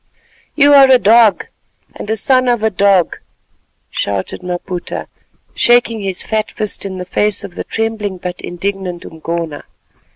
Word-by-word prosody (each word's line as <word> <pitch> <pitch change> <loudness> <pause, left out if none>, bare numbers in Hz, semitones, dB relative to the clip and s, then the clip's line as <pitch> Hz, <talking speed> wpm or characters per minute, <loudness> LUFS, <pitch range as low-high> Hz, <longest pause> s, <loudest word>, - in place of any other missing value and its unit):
"You 285 -1 +5
are 275 -1 +8
a 260 - +7
dog, 225 -1 +4 0.5
and - - -8
a 220 - +1
son 255 +4 +2
of 240 -3 +1
a 220 - +2
dog," 195 -2 +2 0.7
shouted 100 - -3
Maputa, 180 0 -5 0.5
shaking 240 -2 +3
his 195 -3 -3
fat 215 -1 -2
fist 210 -1 -3
in 190 -1 -6
the 180 - -5
face 205 +3 0
of 200 -3 -8
the - - -5
trembling 220 -3 -3
but 180 0 -6
indignant 180 -1 -4
Umgona. 165 -1 -5
200 Hz, 150 wpm, -16 LUFS, 180-225 Hz, 0.7 s, are